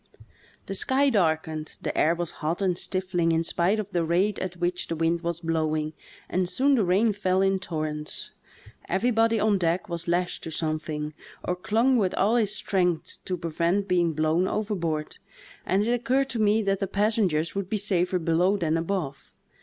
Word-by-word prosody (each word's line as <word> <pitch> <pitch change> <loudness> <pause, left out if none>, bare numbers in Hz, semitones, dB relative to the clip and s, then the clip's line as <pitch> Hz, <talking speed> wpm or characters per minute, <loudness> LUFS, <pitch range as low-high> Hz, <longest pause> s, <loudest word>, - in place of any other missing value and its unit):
The - - -5
sky 270 +7 +3
darkened, 160 -6 0
the - - -2
air 165 +2 +3
was 170 -1 -3
hot 160 +3 -1
and 190 -3 +1
stifling 180 -2 0
in 165 0 +2
spite 175 +5 +1
of 205 -1 -4
the 175 -2 +1
rate 180 +5 +1
at 185 -1 -4
which 175 0 -1
the 165 - -2
wind 165 +1 +1
was 170 -1 -2
blowing, 155 -2 -1 0.3
and 180 -1 0
soon 270 +10 +2
the 240 -6 +3
rain 200 +5 +3
fell 190 -1 +1
in 195 0 +2
torrents. 155 -4 -4 0.6
Everybody 225 +3 +2
on 210 -2 +2
deck 175 +4 0
was 170 0 -3
lashed 175 +1 0
to - - -4
something, 155 -1 -3 0.3
or 180 - -1
clung 230 +8 +2
with 190 -5 +1
all 210 +5 +2
his 210 -3 +2
strength 180 -4 -1
to 185 - -2
prevent 170 +4 0
being 175 -3 +2
blown 155 +4 +1
overboard, 170 -9 -2 0.5
and 195 +2 +2
it 235 - +1
occurred 255 +3 +1
to 235 - -2
me 215 +1 +3
that 195 -1 0
the 195 - -1
passengers 195 -6 +1
would 195 -2 -3
be 215 - 0
safer 185 -3 0
below 175 +4 +2
than 165 -3 0
above. 165 -5 -3
180 Hz, 180 wpm, -26 LUFS, 165-205 Hz, 0.6 s, sky